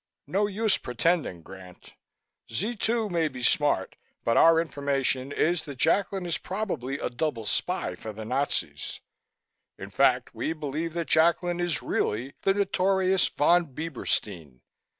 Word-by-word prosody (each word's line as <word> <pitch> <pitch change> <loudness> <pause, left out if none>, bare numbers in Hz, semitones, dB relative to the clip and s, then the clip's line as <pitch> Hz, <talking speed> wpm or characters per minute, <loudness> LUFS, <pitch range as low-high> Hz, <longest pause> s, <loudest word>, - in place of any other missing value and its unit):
No 205 +2 +1
use 210 +1 +1
pretending, 125 - 0
Grant. 95 -1 -13 0.6
Z 210 - -2
2 225 +1 0
may 165 -2 +2
be 130 -4 -7
smart 145 -8 +2 0.3
but 115 - +2
our 165 0 +6
information 140 -4 -1
is 170 +3 +1
that 140 -3 -8
Jacklin 190 +5 +1
is 170 -2 -1
probably 180 - -3
a - - -2
double 120 -3 -2
spy - - -1
for 110 - -7
the 110 +1 -8
Nazis. 115 - -2 0.8
In - - -9
fact, - - +2
we 160 - -2
believe 155 +1 -4
that 170 -1 -3
Jacklin 170 +2 +3
is 175 -4 -1
really 120 +7 -1
the 195 - +2
notorious 190 -1 +2
Von 165 -2 +2
Bieberstein. 100 - -3
155 Hz, 140 wpm, -27 LUFS, 125-180 Hz, 0.8 s, our